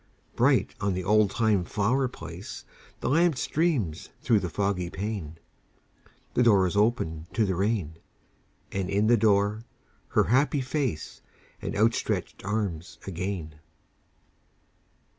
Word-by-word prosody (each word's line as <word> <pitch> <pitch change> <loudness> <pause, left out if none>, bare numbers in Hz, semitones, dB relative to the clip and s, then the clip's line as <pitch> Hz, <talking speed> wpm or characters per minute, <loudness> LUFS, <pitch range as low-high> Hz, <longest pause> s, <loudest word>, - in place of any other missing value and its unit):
Bright - - +3
on 100 -3 0
the 95 - -2
oldtime 105 0 +3
flower 120 +9 +1
place 125 - -9 0.4
The - - -2
lamp 165 0 +3
streams 140 - 0
through 115 -4 +4
the 90 - -3
foggy 100 -1 -1
pane; 95 -6 -5 1.0
The - - +2
door 105 -6 +5
is 90 - -2
opened 95 -7 0
to 110 - +3
the 95 - 0
rain: 95 -4 -1 0.7
And 95 -1 -2
in 100 +2 +2
the 120 +2 +5
door 105 -1 +2 0.5
her - - +3
happy 135 +4 +2
face 130 - -3 0.4
And - - -4
outstretched 110 +3 0
arms 100 -5 -3
again. 90 -4 -4
105 Hz, 120 wpm, -27 LUFS, 90-115 Hz, 1.0 s, door